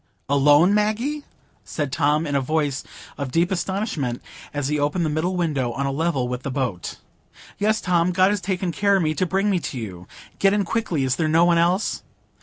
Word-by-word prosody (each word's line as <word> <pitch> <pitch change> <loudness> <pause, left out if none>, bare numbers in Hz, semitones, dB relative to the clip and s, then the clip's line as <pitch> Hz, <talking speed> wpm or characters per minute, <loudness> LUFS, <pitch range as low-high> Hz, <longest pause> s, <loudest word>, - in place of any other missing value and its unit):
"Alone, 145 +6 +5
Maggie?" 225 +8 0 0.4
said 145 -4 -3
Tom, 150 +2 +1
in 145 - -3
a 140 - +2
voice 145 -1 -1 0.4
of 140 -2 -3
deep 170 +6 +1
astonishment, 185 - -2 0.3
as 145 -2 -2
he 150 +1 0
opened 150 +4 0
the 155 - -1
middle 165 +5 -1
window, 145 -8 0
on 140 +2 -2
a 135 - 0
level 140 -3 0
with 125 0 -4
the 135 - -4
boat. 125 -9 -3 0.6
"Yes, 215 +1 +2
Tom; 180 -1 +2
God 185 +2 +4
has 205 -2 -1
taken 185 -1 -2
care 200 +5 +2
of 190 - +2
me, 155 0 +1
to 180 +5 -1
bring 195 +3 +1
me 185 - +2
to 140 - -5
you. 95 -6 -7 0.3
Get 195 0 +4
in 205 -1 +1
quickly. 175 -8 -1
Is 130 -2 0
there 160 - +1
no 165 +2 +4
one 170 -1 +4
else?" 180 +5 +1
165 Hz, 210 wpm, -23 LUFS, 140-190 Hz, 0.6 s, Alone